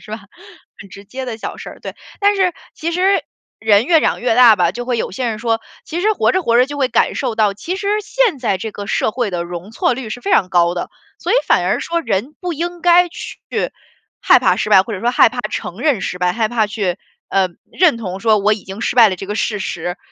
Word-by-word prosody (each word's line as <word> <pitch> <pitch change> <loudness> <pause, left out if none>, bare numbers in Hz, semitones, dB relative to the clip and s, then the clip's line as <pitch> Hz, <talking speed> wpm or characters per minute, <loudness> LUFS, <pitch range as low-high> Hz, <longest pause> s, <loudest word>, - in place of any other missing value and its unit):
是 - - -14
吧？ 215 - -4 0.6
很 195 - -11
直 200 - -12
接 255 +6 -7
的 230 -3 -6
小 - - -6
事 - - -8
儿， - - -13
对。 - - -7 0.2
但 410 0 +3
是 375 -3 +1 0.2
其 330 +2 -3
实 375 +3 +2 0.4
人 215 0 +4
越 330 -3 +5
长 - - 0
越 240 -2 +1
大 235 -3 +7
吧， 175 -1 +2
就 245 +4 -5
会 245 -2 -1
有 - - -3
些 250 +5 -3
人 215 - -4
说 225 0 0 0.2
其 335 - -4
实 430 +3 +2
活 - - +1
着 375 - 0
活 235 -6 +2
着 250 - +5
就 290 +1 -7
会 270 -3 +1
感 - - +1
受 245 -5 -2
到， 210 -3 +2
其 335 - -4
实 400 0 -5
现 425 - 0
在 200 -6 0
这 220 +2 -5
个 205 0 -7
社 215 - 0
会 240 -5 -2
的 175 -1 -3
容 175 +3 -8
错 230 - 0
率 240 -3 -7
是 245 - -5
非 395 - -2
常 185 - +3
高 175 -1 +2
的， 175 - -4 0.3
所 355 - -3
以 - - +4
反 - - +3
而 - - +1
说 335 0 -1
人 255 - -2
不 360 -2 -3
应 345 +2 -4
该 355 0 +5
去 - - -9 0.8
害 - - +5
怕 - - +3
失 215 - -2
败， 190 -2 +7
或 225 - -7
者 200 - -4
说 240 +4 0
害 - - +6
怕 245 +2 -10
承 180 - -5
认 265 -4 +1
失 180 - -4
败， 180 0 +1
害 220 +2 0
怕 220 -2 +1
去， 200 -4 -2 0.3
呃， 190 -1 +2 0.2
认 345 -9 +3
同 190 -4 -5
说 220 0 +3
我 210 +2 +2
已 210 - -4
经 195 +3 -8
失 235 - -2
败 230 -3 +8
了 185 - -2
这 195 - -8
个 210 +2 -4
事 210 -2 -1
实。 175 -1 -4
230 Hz, 280 characters per minute, -18 LUFS, 200-305 Hz, 0.8 s, 败